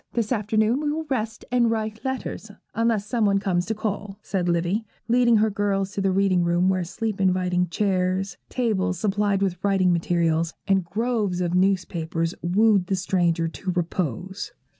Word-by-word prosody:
This 230 -1 -1
afternoon 220 +3 +1
we 295 -1 0
will 315 +1 -3
rest 225 -3 -2
and 245 -2 +3
write 220 -1 -3
letters, 265 -4 -4 0.2
unless 225 -2 +1
some 230 +1 0
one 200 -1 +3
comes 185 -3 0
to 220 - -1
call,' 205 -2 -4
said 180 -3 -1
Livy, 175 +6 0 0.2
leading 240 0 +4
her 215 0 +2
girls 200 -2 0
to 200 - -3
the 195 - +2
reading 185 -2 +2
room, 175 +2 +2
where 185 -1 +1
sleep 210 +3 -3
inviting 180 -1 +2
chairs, 190 0 0
tables 210 -7 0
supplied 200 0 +1
with 180 -2 -2
writing 190 -3 +3
materials, 165 -1 0
and 195 -1 +3
groves 210 -1 -1
of 175 -1 -1
newspapers, 175 -3 0
wooed 195 +1 +3
the 195 - +1
stranger 175 -3 +1
to 185 +3 -6
repose. 180 - -3
195 Hz, 165 wpm, -24 LUFS, 180-215 Hz, 0.2 s, leading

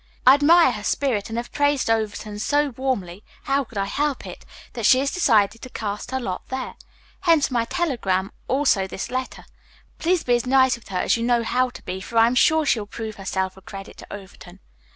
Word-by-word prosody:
I 260 - +9
admire 305 +1 +5
her 210 -3 -6
spirit 230 -4 -1
and 225 - -4
have 240 +1 -4
praised 285 -1 +1
Overton 215 -2 -2
so 290 +6 +1
warmly 230 -8 -3 0.2
how 275 +1 +1
could 235 -4 -12
I 195 - 0
help 285 +6 -2
it? - - -10 0.3
that 230 -3 0
she 255 - +7
has 275 +1 0
decided 225 - +2
to 255 - -9
cast 210 -3 -5
her 260 - -2
lot 185 -7 -4
there. 260 0 -4 0.5
Hence 330 -7 +3
my 235 -2 +1
telegram, 220 - -1 0.2
also 260 -8 +2
this 190 - -6
letter. 255 0 -4 0.5
Please 350 +1 +1
be 245 - +1
as 240 +1 0
nice 260 0 +4
with 235 - -16
her 190 - -4
as - - +2
you 230 - -3
know 240 -1 +2
how 255 +3 +1
to - - -13
be, 185 +1 -5
for 230 +5 -5
I 225 - +7
am 235 - +1
sure 315 +5 +4
she 245 - +2
will 205 - -6
prove 220 0 -7
herself 190 -1 -3
a - - -13
credit 195 0 -10
to - - -13
Overton. 190 -2 -11
235 Hz, 215 wpm, -23 LUFS, 205-270 Hz, 0.5 s, I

